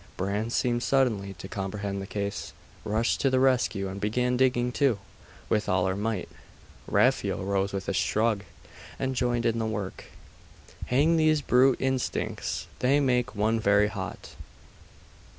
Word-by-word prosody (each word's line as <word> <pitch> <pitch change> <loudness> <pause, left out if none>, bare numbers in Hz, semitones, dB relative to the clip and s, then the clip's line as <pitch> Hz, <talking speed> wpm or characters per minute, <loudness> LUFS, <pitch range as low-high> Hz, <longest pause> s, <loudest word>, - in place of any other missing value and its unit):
Bran 100 +4 -1
seemed 120 0 0
suddenly 115 -8 +1
to 90 +2 -9
comprehend 100 0 -4
the 95 - -7
case, 100 -1 -4 0.3
rushed 110 +3 0
to 135 - +3
the 130 0 +2
rescue, 125 -7 +2
and 95 +1 -6
began 125 +4 +1
digging 125 -1 +2
too, 135 -4 +2 0.5
with 105 -1 0
all 95 -1 +2
her 95 0 0
might. 105 -2 -2 0.6
Raphael - - +2
rose 100 0 0
with 95 -1 -4
a - - 0
shrug, 110 -2 +1 0.5
and 130 0 -1
joined 120 -1 0
in 115 0 +1
the 110 - -1
work................ 105 -3 -5 0.8
'Hang 150 +6 +3
these 155 -1 +3
brute 130 +1 +4
instincts! 130 -1 -2
They 135 +3 +3
make 125 -3 +1
one 110 +2 +1
very 105 0 +3
hot. 100 -1 -7
110 Hz, 150 wpm, -27 LUFS, 100-125 Hz, 0.8 s, brute